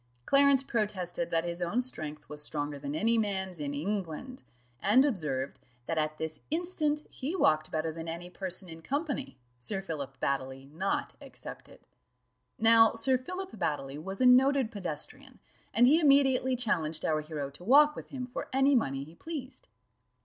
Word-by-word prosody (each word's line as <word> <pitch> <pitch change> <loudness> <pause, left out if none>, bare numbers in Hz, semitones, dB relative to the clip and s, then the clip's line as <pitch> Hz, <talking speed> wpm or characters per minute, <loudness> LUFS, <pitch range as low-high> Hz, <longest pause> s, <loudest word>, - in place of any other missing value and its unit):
Clarence 275 -1 +5
protested 205 -8 -2
that 165 0 +1
his 175 0 -4
own 175 +7 0 0.5
was 150 0 -7
stronger 145 -1 -3
than 140 +1 -4
any 225 +7 +2
man's 190 -4 -2
in 145 -1 -3
England, 200 - -4 0.4
and 250 +7 +5
observed, 150 - -2 0.3
that 165 -1 -1
at 155 0 -1
this 160 -1 -4
instant 310 -3 0
he 285 +7 -3
walked 155 - +3
better 160 0 -1
than 165 +1 -7
any 170 +2 -5
person 185 +1 -6
in 165 -1 -10
company, 280 - -3 0.2
Sir 195 - -3
Philip 140 -8 -6
Baddely 135 0 -2
not 190 +6 -2
excepted. - - -10 0.8
Now 225 0 +6
Sir 260 +3 +3
Philip 365 +9 -5
Baddely 140 -4 -2
was 190 +3 -6
a - - +5
noted 260 -1 +5
pedestrian, 210 - -6 0.3
and 235 +4 +5
he 300 +6 +6
immediately 270 -3 +4
challenged 165 -10 0
our 155 -1 +1
hero 150 -3 -5
to 160 - -11
walk 295 +7 +6
with - - -8
him 260 -3 -5
for 250 - -6
any 270 +2 +4
money 135 - +1
he 155 +3 -13
pleased. 295 - -7
195 Hz, 160 wpm, -30 LUFS, -, 0.8 s, Now